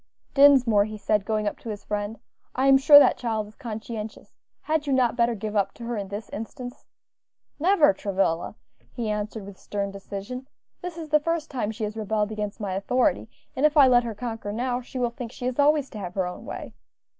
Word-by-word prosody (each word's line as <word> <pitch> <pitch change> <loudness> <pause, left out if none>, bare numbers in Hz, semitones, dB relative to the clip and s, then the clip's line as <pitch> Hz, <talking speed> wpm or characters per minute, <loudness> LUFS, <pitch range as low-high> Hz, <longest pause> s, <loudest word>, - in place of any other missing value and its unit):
"Dinsmore," 260 -7 +6
he 215 0 -7
said, 210 -1 0
going 215 0 0
up - - -3
to 230 - -8
his 210 -2 -6
friend; 210 +1 -3 0.4
"I 260 - +1
am 270 0 +7
sure 290 +2 +9
that 290 - +6
child 220 -3 -1
is 210 - -15
conscientious; 220 -3 -7 0.3
had 310 -1 -1
you 275 - +1
not 250 -3 +2
better 235 -1 +2
give 215 +1 -5
up 200 -2 +1
to 235 - -10
her 235 0 -3
in 200 -2 -4
this 205 +2 -6
instance?" 245 +3 -7 0.7
"Never, 330 - +5
Travilla," 190 -4 -1 0.4
he 230 -4 -2
answered, 210 0 -4
with 200 -1 -11
stern 200 -1 -3
decision. 200 +6 -7 0.3
"This 355 -2 -6
is 320 -2 -7
the 300 0 +5
first 330 0 -2
time 245 -6 -2
she 220 +1 -5
has 210 0 -3
rebelled 215 -1 -1
against 210 -1 -4
my 200 -3 -3
authority, 220 +7 +1 0.3
and 265 - -2
if 305 0 +4
I 280 -2 +8
let 245 -1 +5
her 230 -2 -5
conquer 225 -2 -5
now, 245 +3 -1
she 255 +2 -9
will 245 -2 0
think 235 -1 -7
she 250 - -7
is 255 +2 -2
always 290 -1 +4
to 215 - -7
have 180 -2 -6
her 190 -2 +1
own 180 - -7
way. - - -7
225 Hz, 215 wpm, -25 LUFS, 210-260 Hz, 0.7 s, sure